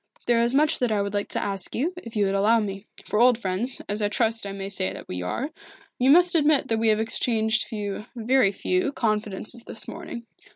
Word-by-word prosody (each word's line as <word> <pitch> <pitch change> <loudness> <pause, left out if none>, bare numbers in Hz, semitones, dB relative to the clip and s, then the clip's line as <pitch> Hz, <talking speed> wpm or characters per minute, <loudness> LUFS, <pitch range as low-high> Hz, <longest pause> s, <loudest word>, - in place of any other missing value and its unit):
There 235 -1 +3
is 235 +2 +1
much 305 +2 +3
that 245 -3 +1
I 210 - +1
would 200 0 -4
like 205 0 -1
to - - -2
ask 195 -2 -2
you, 315 +9 0
if 230 -10 -9
you 205 -1 +2
would 195 - 0
allow 210 +4 +4
me. 200 -1 -5 0.2
For 210 - 0
old 245 0 +6
friends, 225 +4 -3
as 205 +1 -2
I 205 - +1
trust 225 0 0
I - - -5
may 195 0 -5
say 185 - -1
that - - -9
we 90 0 -4
are, 245 - -3 0.5
you 255 +2 +3
must 350 +4 +6
admit 300 -3 +3
that 225 -1 +1
we 225 - +1
have 215 -1 +3
exchanged 220 0 0
few 210 -1 -5
very 240 -2 +3
few 365 - -1
confidences 215 +1 -2
this - - -6
morning. 235 -1 -7
220 Hz, 225 wpm, -25 LUFS, 205-245 Hz, 0.5 s, old